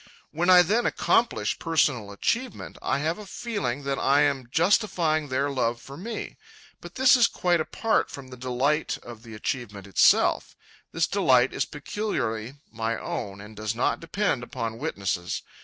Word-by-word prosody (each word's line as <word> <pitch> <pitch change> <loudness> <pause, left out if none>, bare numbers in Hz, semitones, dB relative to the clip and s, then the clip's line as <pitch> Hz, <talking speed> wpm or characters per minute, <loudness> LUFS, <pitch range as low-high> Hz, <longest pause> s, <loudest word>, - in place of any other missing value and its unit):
When 170 +4 0
I 180 -1 +9
then 215 +7 +1
accomplish 235 0 +1
personal 145 -10 +1
achievement, 235 - -2
I - - 0
have 160 +7 -1
a 210 - -8
feeling 145 - -3
that 135 0 -2
I 140 +2 +4
am 140 -4 +1
justifying 165 - +2
their 140 +2 0
love 120 -3 0
for 135 +4 -11
me. 220 +9 -6 0.4
But - - -11
this 260 +1 +6
is 245 -2 +5
quite 175 -2 +1
apart 225 +7 0
from 135 -2 -9
the 130 - -9
delight 130 +5 0
of 120 -2 -10
the 115 -2 -11
achievement 105 -3 -4
itself. 100 -3 +3 0.4
This 165 0 +1
delight 130 -11 +3
is - - 0
peculiarly 140 - -3 0.2
my 115 0 -2
own 100 -3 -5
and 105 +1 -12
does 110 +1 -3
not 120 - 0
depend 165 -5 -1
upon 115 -2 -5
witnesses. 95 - -3
140 Hz, 160 wpm, -26 LUFS, 115-175 Hz, 0.4 s, I